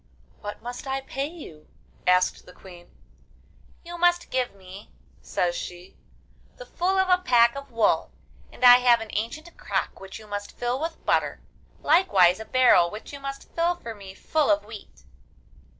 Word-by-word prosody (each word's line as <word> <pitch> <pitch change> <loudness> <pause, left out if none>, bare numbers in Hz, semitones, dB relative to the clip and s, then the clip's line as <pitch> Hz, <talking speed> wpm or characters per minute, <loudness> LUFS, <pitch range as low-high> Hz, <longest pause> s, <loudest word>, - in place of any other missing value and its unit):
'What 205 +1 -8
must 245 +3 -7
I 270 0 -2
pay 270 +1 -4
you?' 295 - -12 0.4
asked 180 0 +2
the 180 - -13
Queen. 175 -2 -15 0.9
'You 345 0 -9
must 350 0 +2
give 250 -5 -1
me,' 190 +1 -13 0.3
says 175 -1 -1
she, 180 +1 -8 0.6
'the - - -11
full 375 -2 -1
of 380 0 +2
a 365 0 +3
pack 235 -4 +4
of 280 0 -8
wool, 230 -2 +1 0.4
and 250 - -1
I 245 0 +10
have 245 -1 +4
an 225 - -8
ancient 310 +11 -5
crock - - -3
which 190 0 -9
you 220 - -13
must 205 -1 -7
fill 245 +2 -2
with 325 +1 -5
butter, - - 0 0.4
likewise 200 - +4
a 220 - -7
barrel 245 -10 +4
which 210 +8 -10
you 280 - -7
must 275 0 -8
fill 340 +1 +1
for 230 -9 -8
me 195 -3 -12
full 310 +3 0
of 205 0 +2
wheat. 205 - -12
240 Hz, 170 wpm, -25 LUFS, 200-290 Hz, 0.9 s, I